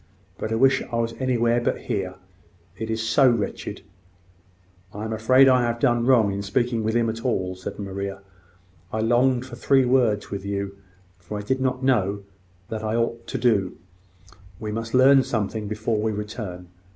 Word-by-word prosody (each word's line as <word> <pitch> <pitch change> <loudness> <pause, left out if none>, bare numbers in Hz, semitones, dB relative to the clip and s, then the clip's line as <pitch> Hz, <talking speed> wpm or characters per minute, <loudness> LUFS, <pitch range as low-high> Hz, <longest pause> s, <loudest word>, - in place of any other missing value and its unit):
But 110 - -3
I - - +1
wish 135 +3 +4
I - - -2
was 115 0 -1
anywhere 120 -2 +1
but - - -1
here - - -3 0.6
it 110 0 -5
is 110 0 -2
so 135 +2 +5
wretched!" 115 -4 -3 1.1
"I 105 +2 -7
am 110 - -3
afraid 130 +5 +5
I 130 -1 +5
have 120 -1 -1
done 120 0 +2
wrong 115 -6 +4
in 100 - -3
speaking 115 +3 0
with 110 +1 -1
him 120 -1 +2
at 115 +1 -4
all," 95 -7 -1
said 95 0 -7
Maria. 100 -1 -5 0.7
"I 110 - -2
longed 120 +2 +2
for 130 - -9
three 135 -2 +3
words 120 -5 +2
with 100 -1 -4
you; 100 0 -3 0.4
for 90 +4 -7
I - - -4
did 130 +5 -1
not 130 0 -1
know 100 -6 +1 0.4
what 110 -1 -5
I 110 +1 -1
ought 115 0 -2
to - - -3
do. 110 -6 +1 0.8
We 105 -1 -4
must 115 +2 -3
learn 135 +1 +7
something 110 -3 -2
before 110 +1 -1
we 110 0 0
return. 105 -4 -6
115 Hz, 180 wpm, -24 LUFS, 105-125 Hz, 1.1 s, learn